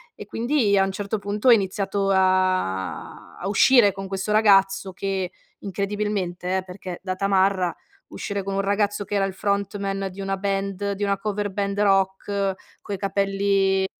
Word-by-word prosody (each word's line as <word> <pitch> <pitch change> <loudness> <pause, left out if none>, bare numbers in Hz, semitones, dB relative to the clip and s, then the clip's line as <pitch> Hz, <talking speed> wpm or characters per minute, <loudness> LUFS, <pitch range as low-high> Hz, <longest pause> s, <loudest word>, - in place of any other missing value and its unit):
E - - -9
quindi 230 -1 +1
a 195 - +5
un 195 - -1
certo 205 +2 -3
punto 205 +4 -2
ho - - +9
iniziato 195 -2 +1
a 185 - 0
a 185 - -3
uscire 210 +1 +5
con 195 +1 -6
questo 195 +2 -2
ragazzo 195 -2 +4
che 190 -1 -3 0.3
incredibilmente, 195 -2 -2
eh, 190 - -2
perché 180 -1 -8
da 185 -1 -3
tamarra, 190 -2 +2 0.3
uscire 200 -1 -4
con 195 +1 -4
un - - 0
ragazzo 205 +1 0
che 205 - -3
era 200 - +2
il 195 -1 -1
frontman 200 0 -2
di 190 - -13
una 195 0 -1
band, 195 0 -2
di 200 +1 -3
una 200 0 +1
cover 205 0 -2
band 200 0 -2
rock, 195 0 +1 0.3
coi 200 - -5
capelli 195 0 +1
195 Hz, 165 wpm, -23 LUFS, 190-200 Hz, 0.3 s, ho